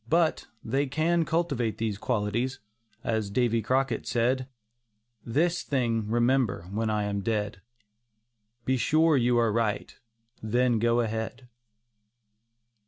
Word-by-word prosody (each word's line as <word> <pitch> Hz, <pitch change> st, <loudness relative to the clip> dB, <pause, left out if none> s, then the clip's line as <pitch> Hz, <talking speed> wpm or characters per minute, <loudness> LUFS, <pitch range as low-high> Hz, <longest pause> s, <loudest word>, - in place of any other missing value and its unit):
But, 165 Hz, 0 st, +2 dB, 0.2 s
they 135 Hz, +5 st, 0 dB
can 160 Hz, +4 st, +1 dB
cultivate 140 Hz, -, -1 dB
these 110 Hz, -3 st, -2 dB
qualities, 120 Hz, +4 st, -1 dB, 0.5 s
as 110 Hz, -3 st, -1 dB
Davy 115 Hz, +1 st, +1 dB
Crockett 130 Hz, +2 st, 0 dB
said: 125 Hz, +2 st, +1 dB, 0.8 s
"This 165 Hz, +9 st, +1 dB
thing 115 Hz, -6 st, -1 dB
remember, 120 Hz, -5 st, +2 dB
when 110 Hz, +2 st, -1 dB
I 105 Hz, -1 st, 0 dB
am 100 Hz, -1 st, -2 dB
dead, 105 Hz, -1 st, -2 dB, 1.0 s
Be 130 Hz, 0 st, +2 dB
sure 155 Hz, +4 st, +3 dB
you 120 Hz, -2 st, +3 dB
are 115 Hz, -2 st, +3 dB
right, 110 Hz, -2 st, -1 dB, 0.5 s
then 120 Hz, +1 st, +2 dB
go 120 Hz, +1 st, +3 dB
ahead." 115 Hz, +2 st, -4 dB
120 Hz, 115 wpm, -27 LUFS, 110-135 Hz, 1.0 s, sure